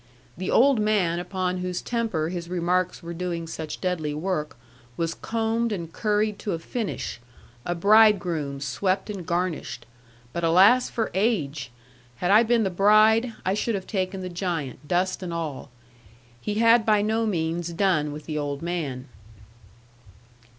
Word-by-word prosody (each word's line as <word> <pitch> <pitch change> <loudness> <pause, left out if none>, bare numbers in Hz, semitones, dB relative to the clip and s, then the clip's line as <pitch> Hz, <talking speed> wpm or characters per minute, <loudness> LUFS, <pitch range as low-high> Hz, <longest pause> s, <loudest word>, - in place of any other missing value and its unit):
The 185 +1 -4
old 265 -1 +5
man 200 -6 +1
upon 180 0 -2
whose 180 0 -3
temper 220 -10 -1
his 175 -1 -5
remarks 180 0 0
were 170 0 -6
doing 170 -1 -3
such 160 -1 -6
deadly 165 -5 -2
work 155 -4 -3 0.4
was 165 0 -1
combed 225 +2 -1
and 170 -5 -5
curried 210 -1 0
to 205 - -3
a - - -1
finish, 200 - -4 0.5
a 175 - 0
bridegroom 175 -8 +3
swept 185 +9 -1
and 195 -4 -6
garnished; 170 -8 -2 0.5
but 170 - -3
alas 190 +10 +5
for 225 -2 -2
age! 155 - 0 0.5
Had 180 +9 0
I 210 +2 +7
been 235 0 +2
the 190 - 0
bride, 215 +5 +4
I 190 - +2
should 215 +2 -1
have 190 -1 -4
taken 190 -1 -2
the 185 - -5
giant, 170 -6 -4
dust 185 +3 0
and 180 -2 -5
all. 160 -5 -4 0.7
He 205 - -3
had 230 +1 +5
by 210 -1 +3
no 220 +1 +1
means 170 -2 -1
done 170 -4 +1
with 150 +1 -8
the 155 -2 -3
old 145 0 -4
man. 155 -7 -3
180 Hz, 155 wpm, -25 LUFS, 165-210 Hz, 0.7 s, I